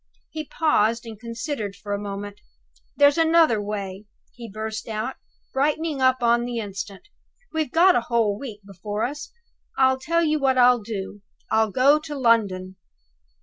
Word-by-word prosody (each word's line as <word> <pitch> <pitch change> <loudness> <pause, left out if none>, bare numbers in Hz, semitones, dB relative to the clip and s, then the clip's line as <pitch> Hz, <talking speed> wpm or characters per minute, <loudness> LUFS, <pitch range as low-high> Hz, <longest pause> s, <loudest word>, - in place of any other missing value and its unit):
He 310 -1 -5
paused, 235 -8 +1
and 220 -2 -9
considered 230 -2 -5
for 205 +1 -6
a 200 - -2
moment. 205 0 -7 0.6
"There's 285 +3 +5
another 325 -9 +4
way!" 200 -1 -5 0.3
he 235 -2 -10
burst 220 +1 -5
out, 220 +4 -4 0.4
brightening 300 +1 0
up 260 -1 +3
on 235 0 +3
the 240 0 -4
instant. 200 - -6 0.5
"We've 315 -4 -1
got 355 +3 +6
the 245 - +2
whole 230 -3 +1
week 220 -7 -8
before 205 +2 -5
us. 290 +4 -6 0.5
I'll 260 0 +3
tell 335 +5 +1
you 310 -1 +1
what 265 -2 +2
I'll 245 -1 +5
do, 205 -1 -6 0.3
I'll 220 0 +3
go 275 +8 +4
to 300 -1 -7
London!" 200 -7 +1
235 Hz, 155 wpm, -23 LUFS, 205-280 Hz, 0.6 s, got